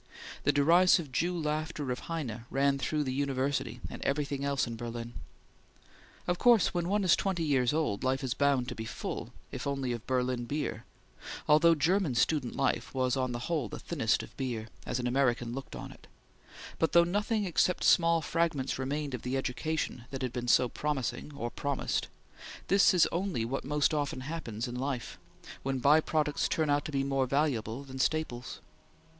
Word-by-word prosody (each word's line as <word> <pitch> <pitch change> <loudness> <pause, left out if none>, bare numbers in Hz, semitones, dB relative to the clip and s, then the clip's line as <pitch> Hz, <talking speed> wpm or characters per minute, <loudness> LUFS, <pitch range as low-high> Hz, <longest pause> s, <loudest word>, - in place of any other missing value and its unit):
The - - +5
derisive 165 +1 +4
Jew 175 +6 0
laughter 155 -2 -2
of 125 - -2
Heine 120 -9 -4
ran 140 0 +2
through 150 +2 0
the 130 -2 -2
university 140 0 -1
and - - -8
everything 140 -1 -1
else 140 -1 +1
in 115 -1 -5
Berlin. 120 0 -6 1.1
Of 175 0 -1
course, 240 -4 +5
when 175 0 -1
one 205 +1 +2
is 180 -2 +5
twenty 185 -4 -1
years 135 -5 +2
old, 150 -10 -1
life 130 +1 0
is 130 -3 0
bound 140 -3 +2
to - - -4
be 110 - -6
full, - - -5 0.2
if - - -5
only 135 -3 -1
of 120 -2 -5
Berlin 125 -1 0
beer, 120 -5 -3 0.6
although 165 +3 +6
German 165 -1 +1
student 125 +1 +1
life 135 -1 0
was 130 0 +1
on 130 -2 0
the 120 0 -4
whole 155 -10 -1
the - - -6
thinnest - - 0
of - - -13
beer, 120 -4 -3 0.2
as - - -1
an 125 - -2
American 120 -2 +1
looked 135 +1 -7
on - - -7
it, - - -16 0.7
but 160 - +1
though 170 - +7
nothing 205 +4 0
except 180 0 +1
small 165 -1 +4
fragments 155 -5 0
remained 140 +1 -2
of 125 - -4
the 125 +2 -2
education 135 -1 -2
that 135 -1 -5
had 125 -2 -2
been 120 -1 -3
so 125 +1 +5
promising 145 +2 -3
or 120 -2 -4
promised 140 -2 -1 0.6
this 200 +3 +6
is 175 - +5
only 170 - -1
what 135 +4 -3
most 150 +2 +1
often 145 -3 -1
happens 130 -7 -4
in 120 - -6
life, 125 -2 -4 0.4
when 135 0 -1
by 145 +5 +5
products 150 -2 0
turn 155 -2 +1
out 145 0 +1
to - - -4
be 135 -1 0
more 135 -1 +1
valuable 130 -3 0
than 130 -1 -9
staples. 130 -4 -1
140 Hz, 185 wpm, -30 LUFS, 125-155 Hz, 1.1 s, though